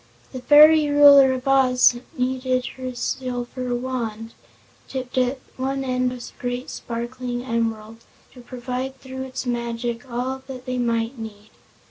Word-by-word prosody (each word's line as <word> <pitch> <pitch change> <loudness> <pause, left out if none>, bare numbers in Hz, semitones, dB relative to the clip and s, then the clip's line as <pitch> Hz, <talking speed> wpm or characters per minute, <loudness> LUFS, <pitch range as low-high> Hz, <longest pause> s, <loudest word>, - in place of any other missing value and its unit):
The 255 - -7
fairy 300 +2 +7
Ruler 285 -2 +8
of 260 +1 -5
Oz 255 -2 +5
only 240 +1 -11 0.3
needed 255 -1 -1
her 255 -1 -5
silver 250 0 -3
wand 230 -3 -4 0.5
tipped 255 -2 -6
at 255 +2 +1 0.2
one 270 +1 -2
end 255 -1 0
with 250 -1 -8
a - - -20
great 245 +1 -4
sparkling 245 +1 -5
emerald 225 -2 -3 0.3
to 250 - -13
provide 255 +2 -5
through 260 0 -8
its 265 0 -5
magic 235 +1 -3
all 255 +2 -3
that 255 -2 -8
they 255 -1 -2
might 230 +1 -1
need. 215 -1 -9
250 Hz, 145 wpm, -23 LUFS, 240-260 Hz, 0.5 s, Ruler